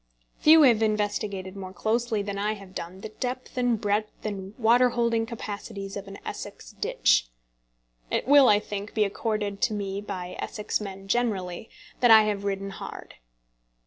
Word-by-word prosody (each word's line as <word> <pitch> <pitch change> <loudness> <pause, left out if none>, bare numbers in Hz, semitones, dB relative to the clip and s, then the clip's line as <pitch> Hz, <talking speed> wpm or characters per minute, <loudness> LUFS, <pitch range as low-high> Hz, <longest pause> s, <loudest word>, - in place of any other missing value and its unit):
Few 315 +1 +7
have 235 -5 +5
investigated 205 -3 -1
more 190 -1 -7
closely 225 0 0
than 200 -1 -4
I 210 +1 0
have 195 -3 -12
done 185 +2 -7
the 220 - -6
depth, 250 +3 -5
and 245 -3 +1
breadth, 210 +1 -2
and 200 -1 -5
water 245 +1 +5
holding 235 -1 0
capacities 205 -3 -6
of 200 -1 -6
an 195 0 -8
Essex - - -7
ditch. - - +2 0.8
It - - -1
will, 280 -1 +7
I 205 -1 +5
think, 205 0 -6
be 215 - +4
accorded 205 -1 -2
to 220 - +2
me 200 -1 -3
by 185 -3 -6
Essex 210 0 -2
men 195 -1 -7
generally 195 -4 -1 0.3
that 245 - +4
I 220 -1 +9
have 205 -1 -2
ridden 195 0 -2
hard. 195 - -9
210 Hz, 165 wpm, -26 LUFS, 195-225 Hz, 0.8 s, I